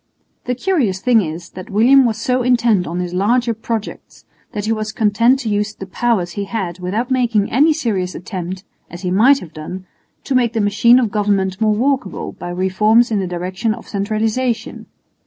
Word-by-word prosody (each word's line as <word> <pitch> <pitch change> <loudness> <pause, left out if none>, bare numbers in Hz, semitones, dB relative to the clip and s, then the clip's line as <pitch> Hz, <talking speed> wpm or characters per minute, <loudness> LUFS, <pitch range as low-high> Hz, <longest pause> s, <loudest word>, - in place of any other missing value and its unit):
The 250 - -1
curious 255 - 0
thing 235 +1 +3
is, 165 -1 -6
that 185 0 -10
William 250 +6 +5
was 225 -2 0
so 250 +2 0
intent 235 -6 +2
on 175 +2 -3
his 180 -1 -4
larger 230 +6 +1
projects 225 -1 -6 0.3
that 205 -1 -4
he 220 - 0
was 215 -1 -2
content 230 +4 +3
to 225 - -3
use 210 +1 -1
the 195 - -8
powers 190 -2 -1
he 200 +2 -4
had 190 -5 -4
without 210 +8 -3
making 235 -5 +1
any 295 +6 +4
serious 205 - -2
attempt, 185 0 -6 0.3
as 175 +2 -10
he 180 - -1
might 240 +9 +5
have 170 -3 -11
done, 180 +4 -7 0.4
to 275 - -3
make 240 -3 +2
the 225 - -1
machine 210 +4 +4
of 235 -5 +1
government 200 -2 0
more 215 -1 +3
workable 260 -4 -1
by 175 - -8
reforms 210 +6 +2
in 210 - +1
the 190 - -2
direction 185 +5 -2
of 235 - -13
centralisation. 220 +3 -2
215 Hz, 190 wpm, -18 LUFS, 185-240 Hz, 0.4 s, William